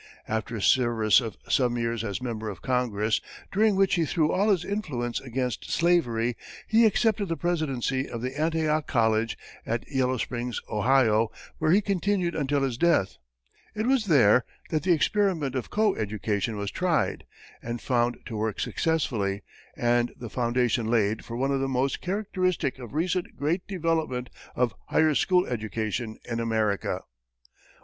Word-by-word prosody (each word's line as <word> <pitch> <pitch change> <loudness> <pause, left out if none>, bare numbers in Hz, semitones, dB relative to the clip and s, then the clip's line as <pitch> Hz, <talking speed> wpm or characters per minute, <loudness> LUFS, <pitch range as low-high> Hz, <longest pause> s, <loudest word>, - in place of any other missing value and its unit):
After 110 +1 -2
a 105 - -3
service 120 -2 +4
of 115 -4 -6
some 125 -2 +2
years 115 -1 -1
as 105 +3 -4
member 110 -3 -3
of 100 - -9
Congress, 115 -4 0 0.3
during 210 +1 +3
which 195 0 +3
he 170 -2 +2
threw 155 -2 +1
all 200 +3 +2
his 185 -4 +2
influence 130 - -2
against 125 -1 -3
slavery, 125 -10 +2 0.3
he 225 +1 +5
accepted 215 -1 +1
the 165 -1 -2
presidency 135 -6 -1
of 115 +1 -4
Antioch 155 +2 0
College, 110 -1 +1 0.3
at 115 +1 -3
Yellow 130 -2 0
Springs, 120 0 -3
Ohio, 115 -1 +3 0.3
where - - +1
he 190 +6 +5
continued 195 -2 0
until 145 -1 0
his 130 -3 -2
death. 165 - +2 0.6
It 215 +1 -1
was 255 -3 +2
there 130 - +5 0.3
that 155 -2 +1
the 185 - +1
experiment 165 -3 +1
of 130 -2 -3
co 210 -2 +2
education 105 0 -2
was 100 0 -3
tried, 180 -3 0 0.3
and 120 0 -4
found 120 -1 +1
to 115 - -6
work 110 0 -2
successfully, 110 -12 -1 0.3
and 120 0 +1
the 120 -3 -8
foundations 120 -2 0
laid 110 -2 +1
for 115 - -6
one 135 +2 0
of 135 - +1
the 135 - 0
most 135 +1 0
characteristic 185 -7 -1
of 125 +2 -9
recent 175 +3 -1
great 160 +6 -1
development 160 -9 -1 0.2
of 120 -4 +1
higher 155 -1 +3
school 180 +4 +3
education 110 0 -3
in 115 -1 -2
America. 110 -3 0
130 Hz, 155 wpm, -27 LUFS, 115-165 Hz, 0.6 s, he